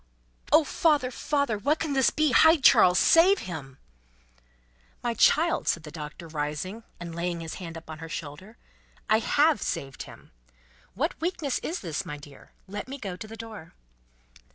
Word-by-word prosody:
"Oh 310 +2 +6
father, 295 -4 +1
father. 280 -5 -1
What 295 +9 +1
can 310 -3 -2
this 265 -2 +4
be! 310 -2 +1
Hide 320 +1 +5
Charles. 180 -7 +6
Save 365 +5 +6
him!" 145 -7 -7 1.3
"My 240 -1 0
child," 320 +9 +3
said 170 - 0
the 150 - -9
Doctor, 155 +1 -8
rising, 155 +7 -4 0.2
and 170 -1 -7
laying 170 0 -3
his 165 -1 -6
hand 165 -2 -7
upon 160 -1 -10
her 165 0 -8
shoulder, 160 +9 -8 0.5
"I 220 - +5
have 295 +6 +2
saved 135 -1 -4
him. - - -15 0.6
What - - -2
weakness 325 -5 -1
is 340 - -4
this, 170 0 -3
my 150 -5 -7
dear! 145 -1 -15 0.2
Let 205 +4 -6
me 275 +2 -6
go 195 -8 -6
to 215 - -9
the 225 +1 -10
door." 215 -7 -10
205 Hz, 165 wpm, -27 LUFS, -, 1.3 s, Oh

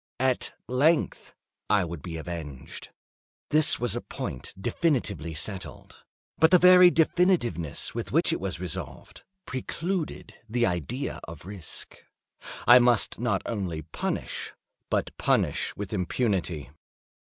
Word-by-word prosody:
At 130 -1 +1
length 150 +6 +1 0.3
I 100 -3 +3
would 85 -2 -7
be 80 0 -6
avenged; 75 -5 -7 0.6
this 155 0 +4
was 120 -1 0
a - - -2
point 65 - -6
definitively 100 - -1
settled—but 95 - -3
the 180 - +7
very 180 0 +8
definitiveness 160 - +1
with - - -4
which - - +3
it - - -2
was - - -3
resolved, 90 -4 -6 0.2
precluded 165 +6 -4 0.2
the 120 +2 +2
idea 90 - -3
of 80 -1 -10
risk. 95 -5 -7 0.7
I 120 +1 +9
must 120 -3 +3
not 120 0 0
only 90 -8 -3
punish, 80 - -4 0.4
but - - -1
punish - - +1
with 105 0 -6
impunity. 90 - -1
105 Hz, 120 wpm, -27 LUFS, 85-135 Hz, 0.7 s, I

